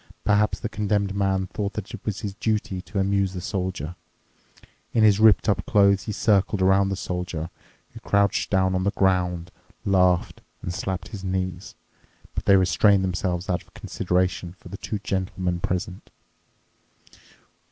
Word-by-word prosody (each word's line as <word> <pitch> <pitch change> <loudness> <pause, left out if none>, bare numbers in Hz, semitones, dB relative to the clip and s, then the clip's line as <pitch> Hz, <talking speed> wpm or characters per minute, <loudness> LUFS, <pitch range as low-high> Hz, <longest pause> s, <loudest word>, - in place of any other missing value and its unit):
Perhaps 105 +1 +2
the 115 - -1
Condemned 105 -2 -1
Man 95 -1 0
thought 100 +1 -4
that 105 -3 -6
it - - -8
was 105 -2 -3
his 100 -2 -4
duty 105 -3 -2
to 100 +3 -8
amuse 100 0 +1
the 90 - -4
Soldier. 90 -4 -3 1.0
In 115 - +4
his 105 -1 +5
ripped 110 -1 +5
up 100 - +2
clothes 100 -5 +4
he - - -3
circled 105 -1 +2
around 95 +1 +4
the 95 - -1
Soldier, 90 -3 -4 0.4
who - - -9
crouched 100 0 +1
down 95 -1 +2
on 95 0 0
the 100 - +2
ground, 90 -3 0 0.3
laughed, 90 -2 +2 0.2
and 90 - -3
slapped 95 0 -4
his 105 -4 -8
knees. 95 -1 -3 0.6
But - - -4
they 100 - +6
restrained 95 +1 +4
themselves 90 -1 -2
out 90 -2 0
of - - -24
consideration 90 -1 -1
for - - -13
the 100 - -7
two 105 - -4
gentlemen 95 -3 -2
present. 95 +1 -3
95 Hz, 160 wpm, -24 LUFS, 90-100 Hz, 1.0 s, they